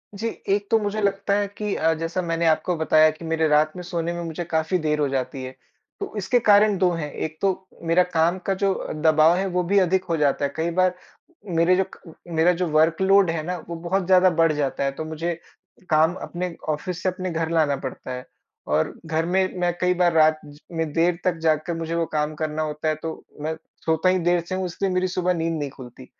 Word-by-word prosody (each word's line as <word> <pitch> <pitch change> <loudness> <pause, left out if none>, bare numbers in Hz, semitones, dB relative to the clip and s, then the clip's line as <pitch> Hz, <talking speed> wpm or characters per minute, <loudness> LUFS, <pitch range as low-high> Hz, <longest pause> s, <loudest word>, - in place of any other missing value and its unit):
जी। 220 +3 -3 0.2
एक 200 +1 +1
तो 225 - +6
मुझे 210 0 -2
लगता 200 0 0
है 205 0 0
कि 210 -1 -2
अ, 165 +1 +2
जैसा 165 +3 -3
मैंने 165 -1 -1
आपको 160 +3 +2
बताया 155 0 +5
कि 155 +2 -11
मेरे 160 0 +1
रात 150 +1 +3
में 180 - -6
सोने 170 -1 -3
में 175 - -5
मुझे 165 +1 -4
काफ़ी 160 +2 0
देर 150 -1 0
हो 145 - +2
जाती 135 0 -3
है। 130 0 -7 0.4
तो - - -5
इसके 205 +5 +2
कारण 210 -2 +5
2 185 -1 +3
हैं, 150 -3 -4
एक 160 0 -5
तो 190 -1 -1 0.2
मेरा 170 +2 +4
काम 170 0 +1
का 195 - +1
जो 195 0 +1 0.3
दबाव 160 +1 +5
है 190 - 0
वो 180 - +2
भी 200 +3 +3
अधिक 185 0 +2
हो 165 - +1
जाता 145 -1 +1
है। 140 - -2
कई 160 +1 -1
बार 185 +1 +2 0.6
मेरे 170 +2 +4
जो 190 +1 +2 0.5
मेरा 165 +2 +4
जो 180 - +1
वर्क 160 +2 +2
लोड 195 -1 +5
है 165 -1 -1
ना, 180 +3 -3
वो 170 - -4
बहुत 175 +3 -1
ज़्यादा 185 0 +5
बढ़ 165 -2 +3
जाता 140 -2 -1
है। 135 - 0
तो 155 +3 -6
मुझे 160 +2 -3 0.5
काम 160 +2 +4
अपने 175 -1 -4
ऑफ़िस 165 +4 -3
से 185 - +2
अपने 185 0 -4
घर 165 -1 -2
लाना 155 -4 +2
पड़ता 130 0 -6
है। 125 0 -6 0.4
और 75 +1 +1
घर 160 0 -1
में 185 +1 0
मैं 175 -1 +1
कई 180 0 +3
बार 180 -1 +3
रात 155 -1 +4
ज 145 0 -13
में 165 -2 -2
देर 170 +1 +2
तक 180 -2 +1
जाग 155 -2 +3
कर 170 - -1
मुझे 165 0 -3
वो 170 0 +1
काम 150 0 0
करना 155 0 -3
होता 155 0 -3
है 155 - 0
तो 160 -1 -5 0.2
मैं 160 +2 -2 0.3
सोता 160 +3 +2
ही 185 - +3
देर 175 0 +2
से 185 - -3
हूँ 185 0 -2
इसलिए 185 +2 -2
मेरी 185 0 +1
सुबह 180 0 0
नींद 165 -1 -1
नहीं 145 -1 -3
खुलती। 130 -1 -12
165 Hz, 235 wpm, -23 LUFS, 155-185 Hz, 0.6 s, तो